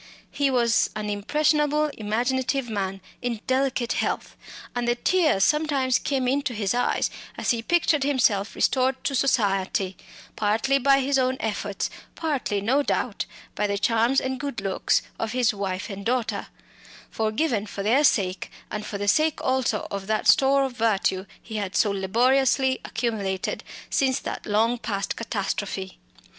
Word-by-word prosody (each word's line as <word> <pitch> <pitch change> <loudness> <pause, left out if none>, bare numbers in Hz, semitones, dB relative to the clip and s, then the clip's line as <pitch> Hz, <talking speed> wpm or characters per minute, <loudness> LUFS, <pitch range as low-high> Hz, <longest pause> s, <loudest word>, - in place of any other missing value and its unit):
He 285 -1 +1
was 235 -3 +3
an 210 -1 -3
impressionable 300 +7 +1
imaginative 245 +4 -1
man 195 -2 -3 0.2
in 245 -3 -2
delicate 260 -2 0
health; - - -2 0.4
and 240 -1 -1
the 240 - +2
tears 305 - +2
sometimes 280 -4 +2
came 265 -3 -1
into 265 -2 0
his 205 -1 0
eyes 245 +1 +1 0.3
as - - +1
he 235 -2 -1
pictured 330 +2 +2
himself 245 -8 +1
restored 260 0 +1
to 280 - -1
society 195 -7 +1 0.4
partly 225 +6 +1
by 275 +1 +4
his 270 +1 +1
own 260 0 +1
efforts, 205 -2 -2 0.2
partly, 280 -11 -1
no 255 +8 +2
doubt, - - -1 0.3
by 210 - 0
the 200 0 -1
charms 230 +4 +2
and 260 -1 -3
good 280 -6 -4
looks 195 -1 +1 0.2
of 225 0 -2
his 250 -3 +2
wife 190 -2 -3
and 200 -1 -7
daughter 240 +1 -1 0.6
forgiven 220 0 0
for 200 0 -5
their 245 +8 +3
sake, 190 -9 +1 0.2
and 210 0 -4
for 205 - -4
the 205 0 -3
sake 310 +6 +3
also 260 -5 0
of 200 -1 -4
that 215 0 0
store 275 +1 +5
of 265 - -1
virtue 200 -5 0
he 220 -1 -7
had 200 -2 -3
so 210 - +3
laboriously 255 +7 +2
accumulated 210 -5 -2 0.3
since 260 -2 +2
that - - -6
long 225 +3 +2
past 205 -3 -2
catastrophe. 200 -3 -3
235 Hz, 150 wpm, -25 LUFS, 205-270 Hz, 0.6 s, store